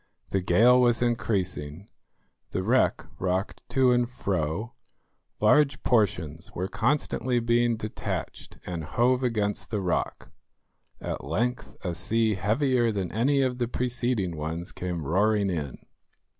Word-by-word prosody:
The 95 - 0
gale 115 +8 +5
was 120 -1 +3
increasing, 95 -8 -2 0.6
the 95 - -2
wreck 125 +6 +2
rocked 95 +2 -1
to 130 -2 +4
and 120 -1 +2
fro, 100 -1 -2 0.7
large 145 +6 +3
portions 85 - 0
were 90 +2 -2
constantly 125 +1 0
being 120 0 +2
detached 110 -1 -5
and 85 -3 -4
hove 125 - +1
against 105 -4 -1
the 105 - -1
rock. 90 -3 -2 0.7
At - - -5
length 115 - -2
a 90 - -2
sea 110 +6 +1
heavier 120 +5 +1
than 95 -4 -3
any 135 +6 +2
of 130 -1 0
the 120 - 0
preceding 120 -7 -1
ones 80 +3 -4
came 90 -4 -4
roaring 100 +4 +2
in. 75 -6 -4
110 Hz, 130 wpm, -27 LUFS, 90-120 Hz, 0.7 s, gale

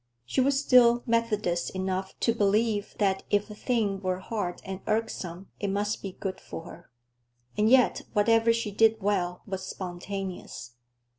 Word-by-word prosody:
She 125 - +1
was 275 +1 +3
still 240 -3 +5
Methodist 215 -7 0
enough 190 0 -3
to 230 - +3
believe 210 0 +1
that 195 -2 +1
if 205 +1 +1
a - - -6
thing 210 -3 -1
were 185 -1 -1
hard 190 -2 -4
and 190 0 -5
irksome, 195 -5 -2
it 205 - -2
must 205 +2 -1
be 195 -2 -6
good 190 0 -5
for 165 - -8
her. 170 0 -12 0.7
And 210 +1 +3
yet, 255 0 +4
whatever 225 +2 +4
she 230 -2 -1
did 220 +2 +4
well 185 -3 -1
was 190 -2 -4
spontaneous. 185 -6 -6
205 Hz, 155 wpm, -28 LUFS, 190-225 Hz, 0.7 s, still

